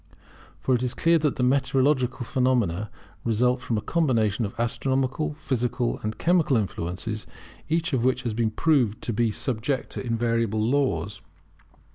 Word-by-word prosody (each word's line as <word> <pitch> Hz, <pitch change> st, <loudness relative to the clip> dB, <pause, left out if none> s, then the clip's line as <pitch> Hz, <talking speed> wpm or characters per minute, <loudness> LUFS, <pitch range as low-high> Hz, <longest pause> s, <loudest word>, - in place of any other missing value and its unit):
For 130 Hz, -, +1 dB
it 125 Hz, -, +2 dB
is 125 Hz, 0 st, -2 dB
clear 165 Hz, 0 st, +3 dB
that 150 Hz, -3 st, 0 dB
meteorological 130 Hz, 0 st, +2 dB
phenomena 115 Hz, -6 st, +1 dB, 0.3 s
result 125 Hz, +3 st, +1 dB
from 115 Hz, -3 st, -1 dB
a -, -, -1 dB
combination 115 Hz, -10 st, +1 dB
of 100 Hz, -, -12 dB
astronomical, 135 Hz, +5 st, 0 dB
physical 125 Hz, -4 st, -1 dB
and 110 Hz, 0 st, -3 dB
chemical 165 Hz, -6 st, +3 dB
influences, 100 Hz, +2 st, -3 dB, 0.4 s
each 165 Hz, -1 st, 0 dB
of 125 Hz, -3 st, +1 dB
which 130 Hz, 0 st, +1 dB
has 120 Hz, -3 st, -2 dB
been 115 Hz, 0 st, +1 dB
proved 120 Hz, -3 st, +2 dB
to 120 Hz, -, -2 dB
be 115 Hz, +1 st, +2 dB
subject 125 Hz, +3 st, -2 dB
to -, -, -4 dB
invariable 115 Hz, -2 st, 0 dB
laws. 105 Hz, -, 0 dB
125 Hz, 145 wpm, -25 LUFS, 110-135 Hz, 0.4 s, clear